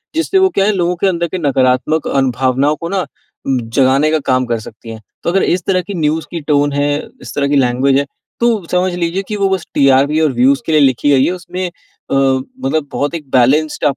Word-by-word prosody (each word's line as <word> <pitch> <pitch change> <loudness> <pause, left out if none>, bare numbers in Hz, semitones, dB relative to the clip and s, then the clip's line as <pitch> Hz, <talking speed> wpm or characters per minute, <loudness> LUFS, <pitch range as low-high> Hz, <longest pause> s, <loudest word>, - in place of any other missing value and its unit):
जिससे 330 +4 +1
वो 380 0 +4
क्या 195 - +1
है 215 - +3
लोगों 180 0 0
के 195 - +3
अंदर 170 -2 0
के 185 - -4
नकारात्मक 135 +1 +1
अन 135 -2 +1
भावनाओं 130 +4 +1
को 170 - -4
ना, 195 -1 0 0.5
उम, 130 -2 +1
जगाने 135 +4 +2
का 160 - +2
काम 130 0 +2
कर 115 -2 -2
सकतीं 115 +1 -11
हैं। 110 -1 -9 0.2
तो - - 0
अगर 195 - +2
इस 180 -1 0
तरह 185 -2 +2
की 200 +2 -8
न्यूज़ 155 +1 0
की 170 -2 -4
टोन 145 -1 +2
है, 145 +1 0 0.2
इस 115 -4 -9
तरह 140 -1 0
की 145 - +1
लैंग्वेज 135 +1 +2
है, 140 - -1 0.3
तो 230 -6 +1
समझ 180 0 +1
लीजिए 175 +3 -2
कि 210 - -3
वो 195 -1 +1
बस 190 -2 -2
टीआरपी 140 +2 +3
और 155 -3 +2
व्यूज़ 130 +3 +3
के 160 - -2
लिए 155 -1 +4
लिखी 135 +1 +2
गई 135 -1 +4
है। - - 0
उसमें 180 0 -5 0.4
अ, - - +1 0.4
मतलब 155 - -1
बहुत 145 +3 -2
एक 150 -5 -8
बैलेंस्ड 145 +5 +2
150 Hz, 230 wpm, -15 LUFS, 135-180 Hz, 0.5 s, वो